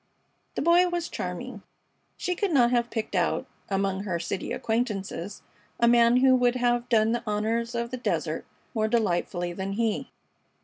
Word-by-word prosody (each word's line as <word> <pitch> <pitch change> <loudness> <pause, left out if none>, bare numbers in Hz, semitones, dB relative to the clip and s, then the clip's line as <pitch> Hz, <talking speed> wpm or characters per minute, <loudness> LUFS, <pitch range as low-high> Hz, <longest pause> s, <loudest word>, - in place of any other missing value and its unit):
The - - -1
Boy 345 +2 +5
was 345 -1 -2
charming. 190 +5 -5 0.6
She 360 - -1
could 390 +1 -1
not 245 -5 +4
have 240 -1 +1
picked 225 -3 -4
out - - +1 0.2
among 195 -1 0
her 185 -4 -2
city 170 +3 -4
acquaintances 205 -5 -2 0.4
a 235 - +4
man 235 0 +5
who 260 0 +5
would 245 -1 +3
have 240 0 +1
done 220 -2 +4
the 240 - 0
honors 225 +3 -1
of 235 +1 -2
the 255 - -3
desert 245 - -2 0.3
more 220 -2 +1
delightfully 175 -5 0
than 195 +2 -4
he. 225 0 -1
235 Hz, 165 wpm, -27 LUFS, 200-245 Hz, 0.6 s, Boy